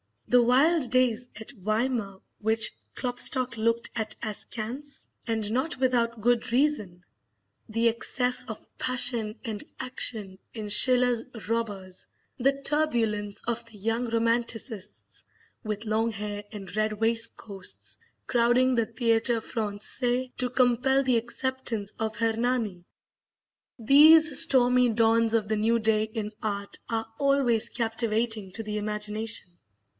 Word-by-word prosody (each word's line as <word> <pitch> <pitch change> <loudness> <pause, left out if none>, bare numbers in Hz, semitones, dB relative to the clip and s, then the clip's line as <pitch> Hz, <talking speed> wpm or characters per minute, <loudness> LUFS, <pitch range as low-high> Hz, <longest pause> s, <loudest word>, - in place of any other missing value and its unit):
The 245 0 +5
wild 265 +4 +3
days 250 -1 +1
at 220 - -8
Weimar 215 -2 -2 0.2
which 220 0 +1 0.2
Klopstock 250 0 +1
looked 230 +1 0
at 215 -2 -3
askance, 235 +6 -7 0.2
and 220 -2 -2
not 260 +7 -1
without 235 -3 0
good 240 +1 +1
reason; 230 -11 0 0.7
the 230 +2 +2
excess 250 +2 0
of 220 -2 -8
passion 240 -3 +2
and 220 -4 -5 0.2
action 210 -6 -1
in 215 -2 -6
Schiller's 245 +1 +4 0.2
"Robbers;" 205 -5 -4 0.3
the 275 +2 +1
turbulence 225 -10 0
of 235 0 -3
the 230 -2 -13
young 225 +4 -2
Romanticists, 230 -2 -2 0.4
with 215 +1 -4
long 220 +1 0
hair 205 0 -5
and 200 -2 -9
red 215 0 0
waistcoats, 225 -3 -1 0.3
crowding 245 +2 +2
the 230 -2 +1
Theatre 230 0 +1
Francais 240 +4 -3
to 250 - -1
compel 255 +2 +2
the 255 -3 +2
acceptance 240 -3 -2
of 220 -1 -2
"Hernani," 225 -5 -1 0.9
these 300 +5 +6
stormy 250 -1 +5
dawns 225 0 +2
of 220 -2 +1
the 215 - +1
new 225 +2 +2
day 215 -1 +1
in 215 -1 -5
art 200 -2 -4
are 225 -1 -2
always 275 -5 +2
captivating 225 -3 -1
to 225 - -4
the 210 0 -4
imagination. 210 0 -1
230 Hz, 120 wpm, -26 LUFS, 215-250 Hz, 0.9 s, these